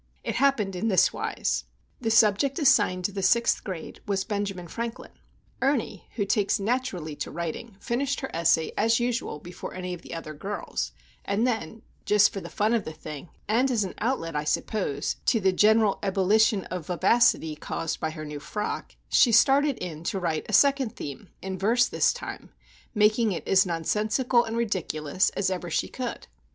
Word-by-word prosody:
It - - -2
happened 230 -9 +2
in 205 +5 -1
this 190 -4 +4
wise. - - -2 0.3
The 225 - -1
subject 225 +5 +4
assigned 205 - +3
the 200 0 -2
Sixth 235 +5 +3
Grade 180 -5 -7
was 195 -2 0
Benjamin 200 -4 -3
Franklin. 235 +5 -6 0.5
Ernie, 260 -8 -1
who 205 - 0
takes 205 +1 +1
naturally 195 - -2
to - - -4
writing, 170 +6 -5
finished 265 +7 -1
her 265 - -5
essay 165 -1 +2
as 225 +2 +3
usual 240 -8 -1
before 175 +4 -9
any 180 -1 -4
of 175 - -8
the - - -8
other 155 -2 -6
girls; 195 +7 -4 0.3
and 205 +4 0
then, 225 -3 -2 0.2
just 210 0 +4
for 195 - -4
the - - -8
fun 215 +2 +1
of 230 -3 +1
the 155 - -6
thing, 155 0 -9 0.2
and 240 +6 +2
as 230 -5 +1
an 190 - -5
outlet, 210 - -1
I 150 - 0
suppose, 150 -3 -1
to 225 - +4
the 190 -2 +2
general 215 +1 +4
ebullition 200 +1 +3
of 180 -4 -5
vivacity 180 -4 +3
caused 165 +1 -4
by 160 - -1
her 155 -1 -7
new 150 -1 -6
frock, 210 +8 -4
she 240 - +5
started 275 +4 +4
in 165 -3 -6
to 195 +1 -1
write 165 -4 -2
a - - -3
second 270 +1 +4
theme, 145 +6 -7
in 190 -1 -4
verse 235 +5 +3
this - - +2
time, - - -7 0.5
making 215 0 +3
it - - -6
as 190 0 +4
nonsensical 215 - +1
and 225 +1 -4
ridiculous 185 -7 0
as 195 -1 +1
ever 180 -2 -3
she - - -1
could. 250 -2 -5
200 Hz, 180 wpm, -26 LUFS, 175-230 Hz, 0.5 s, she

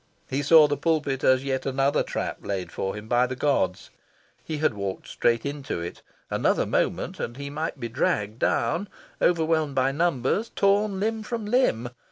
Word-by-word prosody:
He 135 +2 -1
saw 155 +1 +7
the 145 0 -1
pulpit 145 -3 0
as 130 0 +4
yet 135 -1 -1
another 135 +1 +1
trap - - -3
laid 95 -2 -4
for 95 - -3
him 105 +1 -8
by 120 +2 +3
the 130 - -4
gods. 125 -10 0 0.5
He 155 - -4
had 155 -4 +2
walked 100 -2 -5
straight 115 +1 +1
into 140 -9 -4
it: 85 0 -6 0.3
another - - +2
moment, - - -1
and 120 - -4
he 140 0 -6
might 155 0 -3
be 120 - -3
dragged 110 -2 -1
down, 170 +10 +1 0.3
overwhelmed 160 -4 +2
by 130 +1 +2
numbers, 165 - 0
torn 200 0 +2
limb 220 +2 -1
from 225 0 -4
limb. 205 - +1
140 Hz, 175 wpm, -25 LUFS, 120-165 Hz, 0.5 s, saw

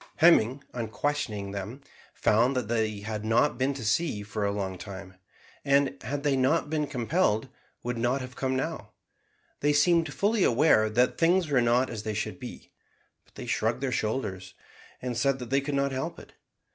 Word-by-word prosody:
Hemming, 140 -6 +4
on 120 -2 -3
questioning 110 -4 -2
them, 105 +7 -6 0.3
found 120 +5 +3
that 125 -4 -1
they 110 -2 -1
had 105 0 -4
not 115 +7 +2
been 130 +2 +2
to 125 -5 -6
sea 110 -2 0
for 105 +1 -4
a 100 - +1
long 95 -2 -3
time, 95 -2 -8 0.5
and, 140 0 +2
had 140 +1 -4
they 145 -2 +2
not 145 +4 +1
been 150 -2 0
compelled, 125 - 0 0.3
would 120 -1 -3
not 120 +3 +1
have 125 -1 -8
come 130 -1 -1
now. 130 -6 -4 0.7
They 145 +1 +2
seemed 165 +3 +3
fully 210 0 +1
aware 115 -4 +4
that 125 +4 +1
things 170 0 +3
were 130 -3 +4
not 120 +2 +2
as 110 -3 -5
they 110 0 -4
should 105 - -3
be; - - -9 0.5
but - - -30
they - - -7
shrugged 115 +3 0
their 135 -2 -1
shoulders, 105 -5 -3 0.5
and 125 -1 -2
said 135 +4 +1
that 125 -2 -8
they 135 +1 +3
could 140 +1 -3
not 140 0 +1
help 130 0 -3
it. - - -13
125 Hz, 185 wpm, -28 LUFS, 110-140 Hz, 0.7 s, Hemming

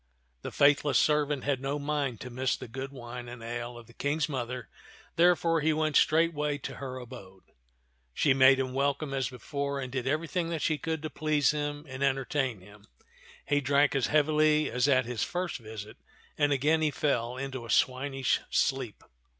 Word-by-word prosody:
The - - -5
faithless 145 0 +4
servant 150 -2 +2
had 135 -3 0
no 140 +2 -2
mind 145 -4 -2
to 125 - -7
miss 130 +1 0
the - - -8
good 135 +4 -6
wine 120 -2 -8
and 120 -1 -9
ale 120 +1 -5
of 120 - -12
the 115 - -18
King's 145 +4 -1
mother, 125 -4 -4 0.5
therefore 170 -1 +3
he 155 +1 +2
went 155 -1 0
straightway 155 -2 +3
to 135 -2 -7
her 130 -2 -6
abode. 115 -7 -11 0.7
She 135 - +3
made 130 0 +6
him 130 -1 -2
welcome 140 +1 -1
as 135 -2 -1
before 140 +2 -4
and 130 -2 -5
did 130 -1 -3
every 155 +4 0
thing 170 -1 -2
that 165 -3 -3
she 155 -2 +1
could 160 +1 -3
to 155 - -4
please 155 -2 +2
him 145 0 -3
and 130 0 -8
entertain 135 -4 0
him. 105 +2 -17 0.6
He 145 0 +1
drank 140 +1 +3
as 135 -3 +1
heavily 155 0 +3
as 125 +3 +1
at 130 -3 +3
his 120 -1 -4
first 180 -4 -2
visit, 110 -2 -9 0.4
and 145 -1 +2
again 150 +4 +2
he 155 - +3
fell 125 -4 -1
into 130 -2 -5
a 115 - -10
swinish 135 +1 +1
sleep. 130 -5 -1
135 Hz, 185 wpm, -29 LUFS, 125-150 Hz, 0.7 s, made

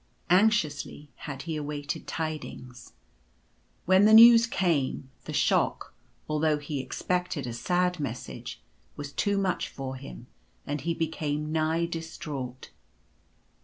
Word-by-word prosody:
Anxiously 160 -7 +2 0.2
had 135 -1 -6
he 160 -1 -4
awaited 145 0 -4
tidings. 155 -6 -6 0.9
When 185 +3 +5
the 215 +1 +7
news 230 0 +9
came, 145 - 0
the - - -6
shock, - - +1 0.3
although 155 0 +1
he 145 -1 -4
expected 180 +3 -2
a 120 - -4
sad 180 +7 0
message, 115 - -6 0.3
was 145 -1 -7
too 205 -1 0
much 190 -2 0
for 130 -1 -6
him, 60 - -10 0.4
and 145 0 -3
he 165 +3 -1
became 155 -2 -2
nigh 160 +1 +1
distraught. 150 -6 -6
155 Hz, 120 wpm, -28 LUFS, 140-180 Hz, 0.9 s, news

